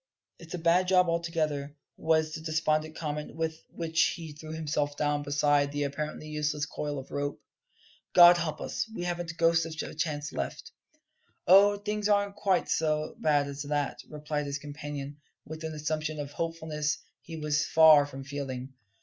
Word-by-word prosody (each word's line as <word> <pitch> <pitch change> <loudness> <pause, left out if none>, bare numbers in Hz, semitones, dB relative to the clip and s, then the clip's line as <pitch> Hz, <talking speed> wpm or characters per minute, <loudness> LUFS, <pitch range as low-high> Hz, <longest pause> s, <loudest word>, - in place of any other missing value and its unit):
"It's 170 0 -7
a - - -3
bad 170 +2 +3
job 180 -1 +4
altogether," 155 -4 -1 0.2
was 160 -1 +1
the 160 - -5
despondent 155 0 0
comment 150 -1 -4
with 160 0 -3
which 165 0 -1
he 165 -3 -8
threw 155 +1 -10
himself 150 -2 -2
down 145 -1 +1
beside 145 0 +2
the 145 0 -1
apparently 150 +2 -4
useless 150 -1 -1
coil 145 0 -4
of 135 - -8
rope. 145 0 -3 0.8
"God 175 0 +10
help 165 -3 -3
us, - - -3
we 175 - -3
haven't 175 -1 -3
a 165 - -6
ghost 165 0 +3
of 160 -1 -5
a - - -10
chance 150 -1 -2
left!" - - -5 0.7
"Oh, 200 +2 +7
things 210 0 -2
aren't 200 -1 +2
quite 195 -3 +1
so 155 -1 0
bad 145 -2 +3
as 140 0 -6
that!" 145 -1 -2
replied 150 -1 -3
his 140 0 -2
companion, 145 -1 -7 0.3
with 160 +1 -8
an 160 0 -4
assumption 155 0 -2
of 145 -1 -5
hopefulness 160 -2 -2 0.2
he 165 -1 -8
was 150 -1 0
far 155 -3 +7
from 135 -1 -8
feeling. 135 -2 -5
155 Hz, 170 wpm, -29 LUFS, 145-165 Hz, 0.8 s, God